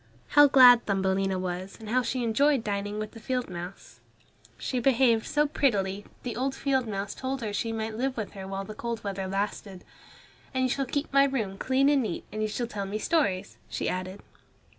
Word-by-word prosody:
How 290 0 +7
glad 250 -3 +7
Thumbelina 195 -1 +1
was, 185 +1 -4
and 220 - -10
how 255 +3 +3
she 250 0 -2
enjoyed 265 +3 +2
dining 205 0 -2
with 215 0 -4
the 225 - -11
field 250 -1 -2
mouse. 175 +2 -8 0.6
She 255 - -2
behaved 240 -3 +3
so 295 0 +2
prettily 205 -9 0
that - - -24
the 245 - -4
old 265 +3 -1
field 265 -3 0
mouse 200 -1 -3
told 265 0 -4
her 215 -3 -3
she 225 +2 -1
might 220 0 -3
live 260 +2 -2
with 215 -3 -4
her 190 -1 -8
while 195 0 -4
the 215 - -7
cold 235 +1 -4
weather 195 -2 -3
lasted. 195 -1 -3 0.7
"And 260 - +2
you 255 - +2
shall 275 -1 -1
keep 285 +2 -3
my 275 0 +6
room 225 -8 -2
clean 265 +1 +2
and 285 -1 +4
neat, 215 -8 -3
and 215 +1 -4
you 215 - +1
shall 235 +3 -2
tell 205 -4 -5
me 205 +2 -3
stories," 205 - 0
she - - -3
added. 185 +2 -4
220 Hz, 205 wpm, -28 LUFS, 195-260 Hz, 0.7 s, How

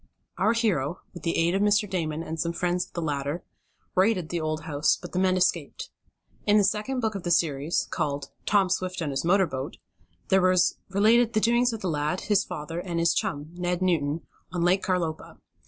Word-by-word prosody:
Our 220 - +3
hero, 185 - 0
with 175 - -9
the 165 - -1
aid 170 +1 +2
of 195 - +1
Mr. 205 0 +3
Damon, 165 -4 -2
and 160 0 -5
some 170 +1 -1
friends 180 +1 -1
of - - -28
the 170 - -3
latter, 145 +2 -2 0.5
raided 185 -3 +2
the 170 -2 -2
old 155 0 -2
house, 150 -1 +1
but - - -9
the 180 - -1
men 185 0 +3
escaped. 180 - -1 0.6
In 205 0 +5
the 205 - +5
second 215 +6 0
book 220 -2 0
of 195 - -4
the 175 - -3
series, 155 -2 +1
called 145 -4 -2 0.2
"Tom 195 -3 +3
Swift 185 -1 -1
and 150 -3 -2
His 135 0 -2
Motor 190 +3 +4
Boat," 135 0 -5 0.5
there 190 -1 +5
was 185 -1 +3
related 220 +4 +4
the 215 - +3
doings 240 +2 +3
of 225 -2 -6
the 190 - -2
lad, 150 +2 -1
his 205 -3 +2
father 150 +3 -5
and 175 -2 -3
his 170 0 +3
chum, 145 +2 -2
Ned 180 +1 -2
Newton, 165 -3 0 0.3
on 175 -2 -1
Lake 185 +2 +3
Carlopa. 170 -4 -2
175 Hz, 205 wpm, -26 LUFS, 160-195 Hz, 0.6 s, In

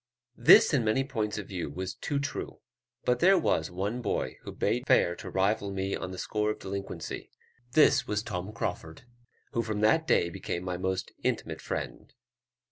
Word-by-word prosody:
This 120 - +8
in 135 -5 +3
many 110 +5 +2
points 110 -6 -2
of 100 -3 -5
view 90 -6 -4
was 95 +5 -4
too 145 - -3
true; 140 0 -4 0.5
but 125 0 +2
there 190 +5 +6
was 80 - +1
one 100 +7 -3
boy 105 - -2
who - - -8
bade 120 +5 -1
fair 85 - +4
to - - -7
rival 100 +1 +1
me 95 0 -2
on 90 - -5
the 95 - -7
score 105 +3 -1
of 105 - -2
delinquency; 95 -3 -6 0.4
this 155 - +5
was 105 0 -1
Tom 95 -2 -4
Crauford, 80 -6 -5 0.5
who 115 - 0
from 110 -2 -3
that 155 +10 +3
day 85 - +3
became 90 -1 -4
my 90 -1 -3
most 95 +1 -2
intimate - - -2
friend. - - -5
105 Hz, 180 wpm, -29 LUFS, 95-115 Hz, 0.5 s, This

